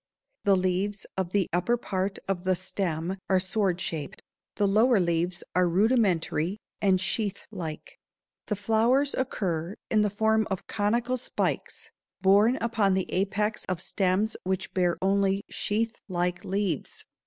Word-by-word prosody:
The 200 -1 +5
leaves 185 +2 -1
of 185 -2 -2
the 200 -2 +2
upper 180 +8 +2
part 195 -3 -2
of 190 -2 -1
the 185 0 +2
stem 180 -1 -2
are 190 -1 +4
sword 190 -1 0
shaped; 155 -5 -5 0.3
the 205 - +2
lower 220 +3 +4
leaves 175 0 0
are 180 -1 +4
rudimentary 190 -3 +2 0.2
and 190 -2 +3
sheath 200 +1 -2
like. 165 -7 -7 0.5
The 210 - 0
flowers 225 +7 +2
occur 185 -8 -2 0.2
in 215 - +4
the 210 - +2
form 220 +1 +2
of 190 -2 -3
conical 235 +4 0
spikes 250 - -3 0.3
borne 200 +5 +5
upon 225 -6 +1
the 190 - -2
apex 210 +3 0
of 185 -2 -2
stems 190 +3 0
which 190 +1 -2
bear 180 -2 +1
only 195 0 +2
sheath 225 +2 -1 0.2
like 180 0 -1
leaves. 190 -5 -2
195 Hz, 140 wpm, -27 LUFS, 180-215 Hz, 0.5 s, The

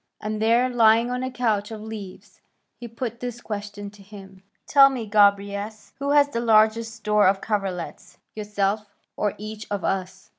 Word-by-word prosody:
And 215 0 -4
there, 230 +3 +3
lying 230 -1 +4
on 250 0 -2
a 260 - -2
couch 220 -5 -1
of 220 -1 -7
leaves, 210 -2 -10 0.4
he 240 - -7
put 235 0 -6
this 245 -1 -5
question 205 -2 -6
to 205 -1 -17
him, 195 -1 -13 0.2
'Tell 275 -2 +7
me, 255 -4 -4
Gobryas, 205 0 +1
who 280 0 -2
has 285 0 +4
the 235 - -3
largest 220 0 +3
store 210 -2 +2
of 195 +1 +2
coverlets, 195 -5 -4 0.2
yourself, 210 0 -2 0.3
or 210 -2 -1
each 215 +1 -8
of 205 -2 -3
us?" 190 0 -3
215 Hz, 170 wpm, -24 LUFS, 205-230 Hz, 0.4 s, Tell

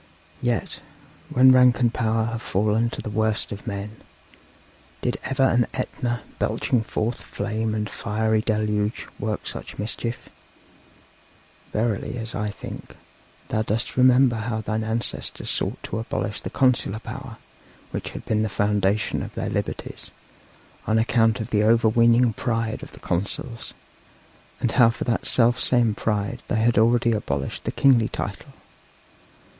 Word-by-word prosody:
Yet, 120 -2 -1 0.5
when 130 +1 +6
rank 125 -1 +6
and 120 -2 +2
power 110 -1 +1
have 115 0 -3
fallen 110 +3 +1
to - - -6
the - - -4
worst 110 0 0
of 105 +3 -7
men, 105 0 -5 1.1
did - - -1
ever 135 0 0
an 120 -2 +3
Etna, 120 -2 -2 0.2
belching 125 - +1
forth 115 +1 -2
flame 110 +1 -2
and 105 -1 -1
fiery 110 +1 0
deluge, 105 -1 0
work 105 0 -3
such - - -7
mischief? 115 +3 -4 1.4
Verily, 110 +2 -1
as 115 -1 -5
I 105 +1 -2
think, 105 - -9 0.5
thou 110 - +1
dost 110 +2 -2
remember 125 -1 +5
how 110 0 -2
thine 110 0 -2
ancestors 110 +2 -2
sought - - -2
to - - -3
abolish 110 -2 -3
the - - -5
consular 125 -5 +2
power, 110 - -8 0.5
which - - -4
had - - -8
been 110 -1 +1
the 110 - 0
foundation 105 0 +1
of - - -7
their - - -2
liberties, - - -4 0.8
on 110 - +3
account 115 0 +3
of 110 +2 -5
the 105 - +3
overweening 115 +1 +4
pride 115 -2 -2
of - - -10
the - - -12
consuls, 110 +6 -4 0.8
and 120 - 0
how 120 -4 +6
for 115 - -3
that 115 - -1
self 120 0 +3
same 120 -3 +3
pride 105 +3 -2
they - - -1
had 110 0 +3
already 120 +1 +4
abolished 70 -11 -2
the - - -1
kingly 125 -5 +4
title! - - -5
110 Hz, 145 wpm, -24 LUFS, 110-120 Hz, 1.4 s, when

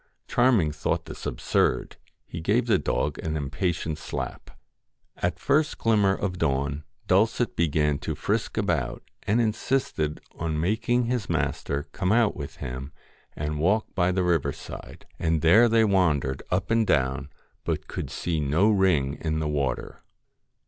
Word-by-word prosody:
Charming 120 -11 +3
thought 75 - -2
this - - -7
absurd; - - 0 0.3
he 85 - -7
gave 110 +8 +2
the 115 - +3
dog 75 0 -1
a - - -4
little 80 -1 -2
impatient 80 +2 -2
slap. - - -5 0.7
At 90 -1 0
the - - -25
first 150 +2 +2
glimmer 105 -4 +3
of 90 -3 -3
dawn, 70 0 0 0.2
Dulcet 110 +5 +2
began 75 -3 +1
to - - -3
frisk - - -1
about, 65 -1 -1 0.2
and 110 +4 +3
insisted 110 - 0
on 80 -1 -2
making 110 +8 +1
his 120 -2 -2
master 70 0 -1
come 90 - -1
out 115 -1 +3
with 70 -4 -7
him, 65 +3 -6 0.4
and 75 0 -3
walk 100 +7 +1
by 90 -1 +2
the 90 0 +1
river 85 -4 +2
side; - - -10
and 80 -1 0
there 100 +9 +7
'74 - - +3
they 115 0 +4
wandered 80 -10 +1
up 90 +4 -1
and 115 -1 +3
down, 65 0 +1 0.3
but - - -2
could - - -5
see 85 -3 -2
no 80 +9 +3
ring 90 -9 +3
THE 75 - -7
FAIR - - -7
in 80 0 0
the 80 - -1
water. 70 -4 -2
85 Hz, 165 wpm, -26 LUFS, 75-105 Hz, 0.7 s, there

